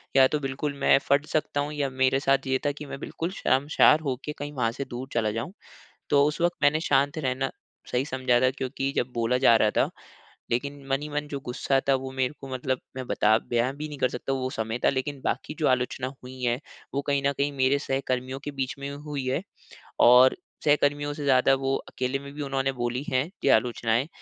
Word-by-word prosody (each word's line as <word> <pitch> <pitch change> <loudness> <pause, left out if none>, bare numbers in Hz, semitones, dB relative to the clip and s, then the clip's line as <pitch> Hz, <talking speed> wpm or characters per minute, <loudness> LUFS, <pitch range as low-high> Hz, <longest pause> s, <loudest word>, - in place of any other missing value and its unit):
या 135 -1 +7
तो 150 - -1
बिल्कुल 140 +1 -3
मैं 135 - +5
फट 140 +1 +3
सकता 150 -1 0
हूँ 145 +1 -3
या 145 -2 -1
मेरे 130 +1 +2
साथ 135 -1 +2
ये 130 0 +2
था 145 - +3
कि 145 +1 -9
मैं 140 -1 -7
बिल्कुल 165 +3 -4
शर्मशार 145 0 +4
होके 135 +3 -3
कहीं 145 +1 -4
वहाँ 120 -5 0
से 140 - -4
दूर 125 +1 -6
चला 110 -2 +1
जाऊँ। 115 - -4 0.6
तो 140 0 +5
उस 150 +2 -2
वक़्त 175 0 +2
मैंने 145 +2 +4
शांत 145 0 +2
रहना 135 -1 -1 0.4
सही 125 +2 +1
समझा 130 -3 +1
था 130 - +4
क्योंकि 135 +1 -3
जब 125 +1 0
बोला 120 +2 +1
जा 120 -3 +6
रहा 110 -1 +3
था। - - +2 0.6
लेकिन 140 +3 -2
मन 135 +1 +1
ही 150 - -5
मन 150 0 -3
जो 140 -1 -4
गुस्सा 135 +2 +1
था 135 - +6
वो 130 0 -4
मेरे 130 +1 0
को 135 - -7
मतलब 130 0 -1 0.2
मैं 130 -1 -5
बता 110 0 +3
बयाँ 120 +3 0
भी 150 +2 -5
नहीं 145 - -7
कर 130 - +2
सकता 125 +2 -3
वो 130 -1 -2
समय 110 +1 -3
था। - - +6
लेकिन 135 +1 -3
बाकी - - -2
जो 155 - +2
आलोचना 130 0 0 0.2
हुई 130 +1 -10
है 120 +1 +1 0.4
वो 140 - +1
कही 140 -1 +2
न 140 - +2
कही 140 +1 0
मेरे 135 0 +2
सहकर्मियों 130 -1 -2
के 145 - -3
बीच 135 -2 -3
में 140 0 -4
हुई 145 -1 -5
है। 130 +5 0 0.6
और 125 +2 +7 0.3
सहकर्मियों 145 -1 +2
से 145 -1 -6
ज़्यादा 135 0 +5
वो 135 0 0
अकेले 130 +2 -2
में 140 0 -10
भी 150 - -5
उन्होंने 135 -1 -1
बोली 120 0 -2
है 130 +5 0
कि - - +2
आलोचनाएँ 120 +2 0
135 Hz, 220 wpm, -26 LUFS, 130-145 Hz, 0.6 s, या